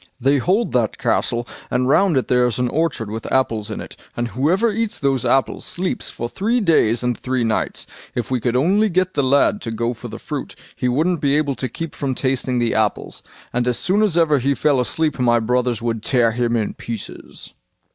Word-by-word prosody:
They 135 +3 +3
hold 195 - +1
that 120 -4 0
castle, 120 0 0 0.2
and 125 +1 +1
round 165 +3 +3
it 130 - 0
there 125 0 +3
is 120 - -2
an 125 -1 0
orchard 140 -9 -1
with 110 +1 -5
apples 115 -5 0
in 110 - -5
it, - - -9 0.2
and 120 0 -1
whoever 180 - +1
eats 225 0 -2
those 135 -3 0
apples 135 0 +1
sleeps 180 +1 -3
for 120 - -4
three 220 - 0
days 125 - +3
and 125 -1 +1
three 130 0 -2
nights. 110 -1 -1 0.3
If 120 0 -3
we 130 - +1
could 120 +1 -1
only 195 +11 +3
get 185 0 +1
the - - +1
lad 140 +9 +3
to - - -5
go 115 +2 -1
for 120 +1 -9
the 110 -1 -7
fruit, 145 +1 -6 0.2
he 125 - -1
wouldn't 155 +7 +1
be 140 0 +2
able 145 -2 +1
to 130 -1 -4
keep 165 +6 -6
from 135 -2 -2
tasting 130 -1 -1
the 120 -1 +1
apples, 110 -1 -1 0.3
and 125 0 0
as 125 - +1
soon 195 +3 +1
as 200 -6 +2
ever 155 -4 +4
he 140 +3 +1
fell 145 -2 +2
asleep 150 +3 0
my 120 -1 +3
brothers 125 0 0
would 115 -2 -1
tear 120 0 +2
him 120 +1 0
in 110 -3 -1
pieces." 115 -3 -8
130 Hz, 215 wpm, -20 LUFS, 120-155 Hz, 0.3 s, ever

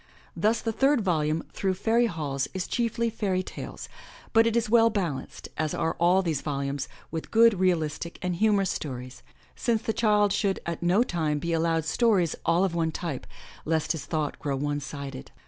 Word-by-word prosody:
Thus 220 +2 +1
the 225 - -1
third 270 +3 +3
volume. 160 -4 0
Through 190 -1 0
Fairy 230 +5 +2
Halls, 145 -7 -2
is 185 - -1
chiefly 230 -1 -1
fairy 195 -4 -1
tales, - - -8 0.5
but 225 0 +6
it 230 - 0
is 235 0 +1
well 230 +1 +5
balanced, 180 -11 -4
as 155 -1 0
are 160 - -1
all 180 +3 +4
these 160 -5 -1
volumes, 140 -1 -2 0.2
with 160 0 -5
good, 225 -3 +5
realistic 170 -3 0
and 180 -1 -2
humorous 205 -2 +3
stories, 125 -3 -6 0.3
since 230 -2 0
the 225 - -1
child 210 -3 +3
should 200 -2 0
at 170 -1 -4
no 180 +7 +4
time 160 -8 -1
be 170 +3 -2
allowed 165 -1 +1
stories 185 -1 +2
all 170 +2 +4
of 190 -3 0
one 165 -1 0
type, 155 -5 -5 0.4
lest 160 -1 0
his 160 -4 -3
thought 155 -3 -2
grow 140 -2 -2
one 145 +1 -1
sided. 140 -1 -7
175 Hz, 180 wpm, -27 LUFS, 155-215 Hz, 0.5 s, but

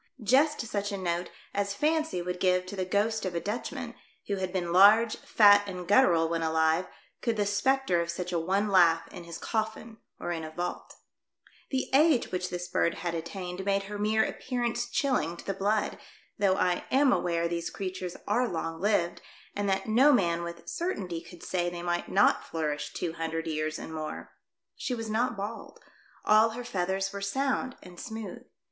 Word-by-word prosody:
just 280 +7 +4
such 205 -3 -3
a 200 - -3
note 175 -1 -2 0.2
as 200 0 -1
fancy 310 - 0
would 180 0 -4
give 185 0 +2
to 185 - -7
the 185 -1 -2
ghost 215 +4 0
of 185 -2 -3
a - - +1
Dutchman, 210 +7 -4 0.3
who 200 - -2
had 185 -1 -2
been 175 -2 -2
large, 215 +4 +7
fat 205 -2 +6
and 180 -2 -6
guttural 180 -7 +5
when 165 0 -1
alive, 160 +2 +2 0.3
could 230 -3 0
the 205 - +1
spectre 205 -2 +2
of 170 - -4
such 180 +1 -4
a 170 - +2
one 195 +5 0
laugh 170 -4 +4
in 175 - -10
his 170 -1 -7
coffin 220 0 -3 0.2
or - - -3
in 165 -2 -3
a 155 - -5
vault. 175 +3 -5 0.7
The 265 -1 -1
age 290 -2 +4
which 180 0 -2
this 175 0 -4
bird 170 - +1
had 170 - 0
attained 180 +2 -5
made 195 0 +1
her 205 +1 -6
mere 215 +1 +2
appearance 240 -1 -2
chill 265 +1 +1
ing 170 +1 -3
to - - -11
the 195 - -1
blood, 205 +3 0 0.4
though 195 -2 +3
I 180 -2 0
am 270 0 +4
aware 170 -1 0
these 170 0 -3
creatures 185 -2 -5
are 250 +1 +2
long 165 -3 -4
lived 190 -4 +1 0.3
and 205 -1 -1
that 195 0 0
no 255 +7 +6
man 170 -9 +2
with 170 0 -7
certainty 195 - -3
could 175 0 -13
say 175 -2 -1
they 175 0 -7
might 175 0 -1
not 200 +2 +4
flourish 150 -2 -3
two 170 -2 -3
hundred 165 0 -3
years 155 0 -2
and 160 - -8
more. 155 -1 -6 0.4
She 250 - -3
was 225 -2 -5
not 235 +2 0
bald. 210 +3 -6 0.5
All 215 +1 +6
her 245 - -4
feathers 190 -2 -1
were 200 - -5
sound 260 +4 -1
and 180 -1 -12
smooth. 220 -5 -7
190 Hz, 190 wpm, -29 LUFS, 170-220 Hz, 0.7 s, large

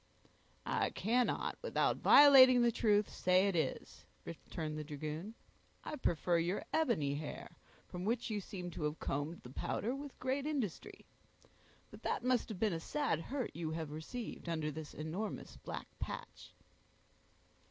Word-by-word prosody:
"I - - +1
cannot, 240 +3 0
without - - +1
violating 260 -4 +8
the 235 - +4
truth, 210 -2 +3
say 185 +2 +3
it 195 - 0
is," 160 - -2 0.2
returned 155 -1 -5
the - - -4
dragoon. 155 +7 -5 0.5
"I - - -4
prefer 175 - +1
your 175 +4 -1
ebony 195 - +2
hair, 150 +1 -6 0.3
from 180 0 -6
which 230 +3 -1
you 210 -1 -1
seem 180 -3 -6
to 160 - -5
have 150 +1 -2
combed 145 +5 -3
the 125 - -10
powder 225 - -2
with 280 0 -8
great 270 +3 -1
industry. 265 - -3 0.9
But - - -12
that - - -1
must 250 -1 +1
have 215 - -5
been 215 -3 +2
a 165 - -2
sad 285 - -1
hurt 255 - -3
you 165 -1 -3
have 160 -2 -4
received 170 +5 -6
under 155 -2 -1
this 155 0 -8
enormous 170 +8 -5
black - - -6
patch." - - -7
185 Hz, 155 wpm, -35 LUFS, 160-240 Hz, 0.9 s, violating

